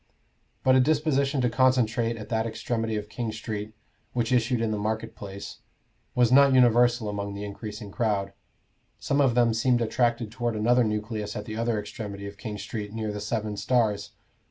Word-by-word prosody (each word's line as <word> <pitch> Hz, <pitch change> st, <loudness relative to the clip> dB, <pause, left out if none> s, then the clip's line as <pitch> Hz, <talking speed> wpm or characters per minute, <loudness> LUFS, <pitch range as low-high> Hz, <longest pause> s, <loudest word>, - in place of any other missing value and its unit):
But 130 Hz, -, +5 dB
a -, -, +6 dB
disposition 140 Hz, -1 st, +2 dB
to 125 Hz, -, +2 dB
concentrate 120 Hz, -2 st, +2 dB
at 105 Hz, -, -9 dB
that 110 Hz, -1 st, 0 dB
extremity 115 Hz, 0 st, -2 dB
of 105 Hz, 0 st, -3 dB
King 110 Hz, +2 st, -4 dB
Street 110 Hz, -1 st, -5 dB, 0.4 s
which 120 Hz, -1 st, 0 dB
issued 125 Hz, 0 st, +2 dB
in 115 Hz, -1 st, 0 dB
the 105 Hz, -, -1 dB
market 110 Hz, +2 st, -3 dB
place, 100 Hz, -1 st, -8 dB, 0.6 s
was 125 Hz, -1 st, +4 dB
not 140 Hz, 0 st, +6 dB
universal 120 Hz, -2 st, +4 dB
among 100 Hz, -1 st, -4 dB
the 100 Hz, -, -5 dB
increasing 105 Hz, 0 st, -7 dB
crowd. 100 Hz, -4 st, -1 dB, 0.6 s
Some 140 Hz, +1 st, +1 dB
of 130 Hz, -4 st, +3 dB
them 120 Hz, -2 st, +4 dB
seemed 120 Hz, +2 st, +2 dB
attracted 115 Hz, -1 st, 0 dB
toward 120 Hz, -1 st, -2 dB
another 120 Hz, +3 st, +3 dB
nucleus 105 Hz, -1 st, -3 dB
at 105 Hz, -, -5 dB
the 110 Hz, -, -6 dB
other 115 Hz, -1 st, 0 dB
extremity 105 Hz, -1 st, -6 dB
of 100 Hz, 0 st, -9 dB
King 105 Hz, -2 st, -5 dB
Street, 105 Hz, -1 st, -5 dB
near 110 Hz, -1 st, -3 dB
the 105 Hz, 0 st, -5 dB
Seven 105 Hz, -2 st, -2 dB
Stars. 110 Hz, -3 st, 0 dB
115 Hz, 180 wpm, -26 LUFS, 105-120 Hz, 0.6 s, a